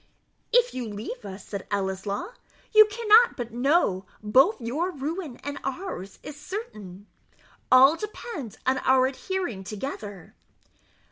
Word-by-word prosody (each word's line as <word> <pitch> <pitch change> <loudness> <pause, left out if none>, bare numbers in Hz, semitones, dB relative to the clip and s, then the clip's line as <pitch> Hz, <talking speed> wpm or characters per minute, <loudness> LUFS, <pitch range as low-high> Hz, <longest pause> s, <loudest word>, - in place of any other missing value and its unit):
"If - - +4
you 245 -3 -4
leave 210 +4 -7
us," 195 0 -8
said 200 -2 -6
Ellieslaw, 200 - -3 0.4
"you 430 0 +9
cannot 450 +2 +5
but 240 -2 -5
know 245 - +2 0.2
both 265 - +4
your 275 +10 -2
ruin 310 -2 -5
and 285 0 -5
ours 270 - -5
is 295 - -8
certain; 215 - -8 0.7
all 265 +4 +8
depends 350 - -7
on 260 +1 +2
our 260 0 +4
adhering 270 - -3
together." 205 - -7
265 Hz, 125 wpm, -26 LUFS, -, 0.7 s, you